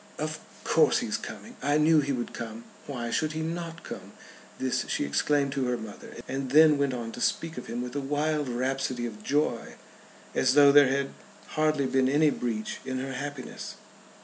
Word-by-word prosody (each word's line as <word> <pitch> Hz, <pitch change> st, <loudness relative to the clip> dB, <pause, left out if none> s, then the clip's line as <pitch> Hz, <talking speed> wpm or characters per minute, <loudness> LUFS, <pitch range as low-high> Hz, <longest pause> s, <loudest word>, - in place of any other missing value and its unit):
"Of -, -, -3 dB, 0.2 s
course -, -, +4 dB
he -, -, -1 dB
is -, -, -1 dB
coming. -, -, -9 dB
I 145 Hz, +1 st, +2 dB
knew 155 Hz, +1 st, +5 dB
he 140 Hz, 0 st, -2 dB
would 120 Hz, -3 st, -3 dB
come. 115 Hz, 0 st, -6 dB, 0.2 s
Why 120 Hz, -4 st, -4 dB
should 155 Hz, +5 st, 0 dB
he 160 Hz, -, -3 dB
not 165 Hz, 0 st, -5 dB
come?" -, -, -8 dB, 0.4 s
This 130 Hz, -1 st, 0 dB
she -, -, 0 dB
exclaimed 140 Hz, -, +1 dB
to 135 Hz, -1 st, -1 dB
her 125 Hz, 0 st, 0 dB
mother, 110 Hz, -2 st, -9 dB
and 135 Hz, 0 st, -3 dB
then 150 Hz, +1 st, +6 dB
went 140 Hz, -2 st, +1 dB
on 115 Hz, -2 st, -5 dB
to 120 Hz, -, -8 dB
speak 165 Hz, +5 st, 0 dB
of -, -, -7 dB
him 120 Hz, +1 st, -3 dB
with 125 Hz, +2 st, -7 dB
a 145 Hz, -, 0 dB
wild 145 Hz, +1 st, 0 dB
rhapsody 130 Hz, 0 st, -1 dB
of 105 Hz, -3 st, -7 dB
joy, 140 Hz, -2 st, 0 dB, 0.6 s
as 130 Hz, +1 st, +3 dB
though 145 Hz, -1 st, +8 dB
there 145 Hz, -1 st, +8 dB
had 135 Hz, +1 st, 0 dB, 0.4 s
hardly 155 Hz, -2 st, +1 dB
been 130 Hz, 0 st, +2 dB
any 150 Hz, +2 st, +4 dB
breach 110 Hz, -5 st, -3 dB
in 130 Hz, 0 st, -3 dB
her 135 Hz, +1 st, -4 dB
happiness. 140 Hz, 0 st, -6 dB
135 Hz, 195 wpm, -28 LUFS, 125-150 Hz, 0.6 s, though